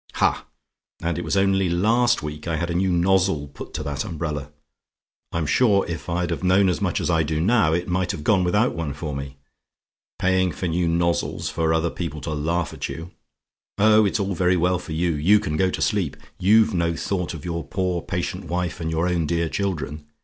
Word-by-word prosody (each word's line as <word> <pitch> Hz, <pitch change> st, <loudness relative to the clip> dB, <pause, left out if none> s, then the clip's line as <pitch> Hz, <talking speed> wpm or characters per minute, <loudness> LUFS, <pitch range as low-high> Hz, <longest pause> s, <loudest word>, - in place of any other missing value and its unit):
"Ha! -, -, +1 dB, 0.5 s
and 85 Hz, 0 st, -2 dB
it -, -, -4 dB
was -, -, -1 dB
only 95 Hz, -1 st, +2 dB
last 115 Hz, +7 st, +2 dB
week 75 Hz, +1 st, -6 dB
I 85 Hz, -, 0 dB
had 85 Hz, +2 st, -2 dB
a -, -, -1 dB
new 95 Hz, +2 st, +1 dB
nozzle 90 Hz, -3 st, +2 dB
put 70 Hz, -, -10 dB
to -, -, -3 dB
that 70 Hz, -1 st, -3 dB
umbrella. 75 Hz, -3 st, -4 dB, 0.8 s
I'm 85 Hz, -1 st, -1 dB
sure, 100 Hz, -, +3 dB
if 85 Hz, -1 st, -5 dB
I'd 85 Hz, +1 st, -1 dB
have -, -, -3 dB
known 95 Hz, +1 st, +4 dB
as 90 Hz, -, -1 dB
much -, -, 0 dB
as -, -, 0 dB
I 80 Hz, -1 st, +3 dB
do 75 Hz, 0 st, -1 dB
now, 90 Hz, -3 st, +3 dB
it 85 Hz, +1 st, -1 dB
might 90 Hz, 0 st, 0 dB
have 75 Hz, -, -6 dB
gone 95 Hz, +1 st, +3 dB
without 105 Hz, +7 st, +2 dB
one 80 Hz, -4 st, -4 dB
for 75 Hz, -1 st, -5 dB
me. 70 Hz, 0 st, -6 dB, 0.8 s
Paying 95 Hz, -1 st, +2 dB
for 90 Hz, -, -4 dB
new 85 Hz, +1 st, 0 dB
nozzles, 85 Hz, +1 st, 0 dB
for 80 Hz, -1 st, 0 dB
other 80 Hz, +1 st, +1 dB
people 80 Hz, -4 st, -5 dB
to 80 Hz, -, -4 dB
laugh 80 Hz, +3 st, -1 dB
at -, -, -5 dB
you. 80 Hz, +2 st, -7 dB, 0.7 s
Oh, 110 Hz, +1 st, +5 dB
it's 100 Hz, +1 st, +1 dB
all 100 Hz, 0 st, -1 dB
very 90 Hz, 0 st, +2 dB
well 90 Hz, +1 st, +2 dB
for 85 Hz, -, -7 dB
you 85 Hz, +2 st, +1 dB
you 85 Hz, +8 st, +4 dB
can 75 Hz, -, -3 dB
go 95 Hz, +4 st, +2 dB
to -, -, -4 dB
sleep. 95 Hz, -9 st, 0 dB, 0.2 s
You've 110 Hz, +3 st, +4 dB
no 85 Hz, -2 st, 0 dB
thought 90 Hz, -1 st, -2 dB
of 75 Hz, -, -9 dB
your 85 Hz, -1 st, -3 dB
poor 90 Hz, +4 st, -2 dB
patient -, -, -4 dB
wife, 90 Hz, 0 st, -2 dB
and 80 Hz, -, -2 dB
your 80 Hz, +2 st, 0 dB
own 85 Hz, -3 st, 0 dB
dear 85 Hz, 0 st, 0 dB
children. 75 Hz, -7 st, -3 dB
85 Hz, 215 wpm, -23 LUFS, 80-95 Hz, 0.8 s, Oh